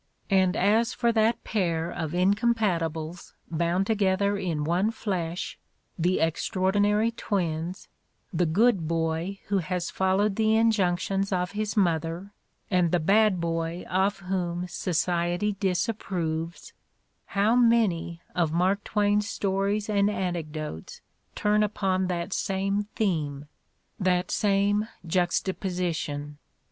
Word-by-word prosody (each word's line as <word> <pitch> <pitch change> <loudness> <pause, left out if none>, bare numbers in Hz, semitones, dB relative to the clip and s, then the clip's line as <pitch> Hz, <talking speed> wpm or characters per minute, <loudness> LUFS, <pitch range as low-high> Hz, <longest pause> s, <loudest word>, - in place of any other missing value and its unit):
And 190 -2 +3
as 220 +5 +2
for 235 -1 +2
that 225 +1 +2
pair 170 -5 -1
of 165 -2 -4
incompatibles 180 -5 0 0.2
bound 170 +3 +1
together 200 -1 +1
in 175 -7 -2
one 175 +7 +1
flesh 185 -6 -3 0.2
— - - -29
the 185 +1 +2
Extraordinary 205 +6 +1
Twins, 175 -5 -3 0.5
the 175 0 +2
"good" 195 0 +3
boy 165 +4 -1
who 200 -1 +2
has 180 0 -3
followed 195 +2 +1
the 220 0 +3
injunctions 195 -3 +1
of 180 -1 0
his 210 +1 -3
mother 170 +1 0 0.4
and 180 -3 +3
the 175 - +3
"bad" 200 +3 +3
boy 165 +1 -2
of 195 +2 0
whom 180 -2 -2
society 175 +3 0
disapproves 180 -4 -2 0.3
— - - -46
how 210 +4 +4
many 215 -9 +2
of 170 -4 +1
Mark 185 +5 +1
Twain's 210 0 +1
stories 200 +1 -1
and 205 -1 +2
anecdotes 160 - -4 0.3
turn 210 0 +2
upon 190 -3 0
that 180 +1 -2
same 195 +1 -1
theme, 150 -9 -1 0.5
that 180 -2 +1
same 205 +1 +2 0.2
juxtaposition! 175 -4 -1
185 Hz, 115 wpm, -27 LUFS, 170-205 Hz, 0.5 s, how